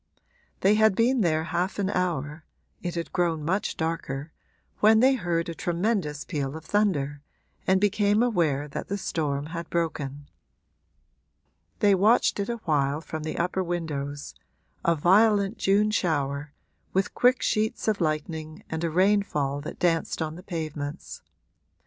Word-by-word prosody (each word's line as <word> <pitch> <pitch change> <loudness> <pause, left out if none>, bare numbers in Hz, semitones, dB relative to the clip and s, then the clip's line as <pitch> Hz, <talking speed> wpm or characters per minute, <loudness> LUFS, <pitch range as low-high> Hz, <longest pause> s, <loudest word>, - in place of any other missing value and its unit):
They 195 +2 +5
had 220 -2 +4
been 240 +3 +3
there 160 -4 +2
half 175 +3 -2
an 200 -1 0
hour 160 -5 -2 0.4
it 175 -1 -4
had 170 -1 -4
grown 165 -4 0
much 190 +5 -1
darker 160 -3 -3 0.5
when 220 +1 +6
they 260 +3 +5
heard 175 -8 -1
a 170 - -4
tremendous 175 -4 -1
peal 145 -2 -3
of 160 - -12
thunder 150 -8 0 0.5
and 190 0 +4
became 205 +2 +3
aware 160 - +1
that 140 - -6
the 200 - -2
storm 145 -6 -2
had 170 -1 -5
broken. 145 -4 -3 1.5
They 205 -2 +5
watched 210 +4 +3
it 200 - -2
a 235 - -2
while 145 -2 +1
from 160 -1 -6
the 155 - -4
upper 180 +2 0
windows 145 -5 -4 0.5
a 170 - +3
violent 200 +5 +3
June 205 +2 +3
shower, 145 -7 -1 0.4
with 195 +2 0
quick 250 +1 +3
sheets 215 +1 0
of 210 -3 +1
lightning 155 0 -3
and 160 +1 -3
a 165 - +1
rainfall 165 -6 +1
that 150 - -7
danced 165 -2 0
on 155 -1 -2
the 175 - -10
pavements. 155 -4 -5
170 Hz, 150 wpm, -26 LUFS, 150-200 Hz, 1.5 s, when